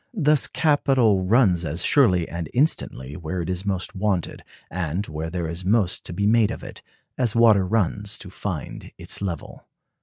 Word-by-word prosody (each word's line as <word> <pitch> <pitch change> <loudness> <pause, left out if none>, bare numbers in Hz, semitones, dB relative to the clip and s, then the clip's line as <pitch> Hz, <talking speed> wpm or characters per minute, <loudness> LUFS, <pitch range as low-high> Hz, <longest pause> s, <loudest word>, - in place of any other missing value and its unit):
Thus 150 -4 +3
capital 130 -10 +2
runs 95 -5 +3
as 80 +2 -2
surely 105 - +3
and 85 -2 -5
instantly 75 - 0
where 85 +2 -5
it 85 - -3
is 90 +2 -4
most 95 -1 -2
wanted, 95 -3 -2 0.3
and 90 +2 -2
where 80 0 -5
there 85 -1 -3
is 85 +3 -5
most 100 -1 +1
to - - -5
be 100 +4 -2
made 110 0 +4
of - - -6
it, - - -10 0.4
as 120 -4 0
water 110 -5 +5
runs 105 0 0
to 95 - -11
find 90 -7 -6
its - - -4
level." 90 -4 -6
95 Hz, 175 wpm, -23 LUFS, 85-115 Hz, 0.4 s, water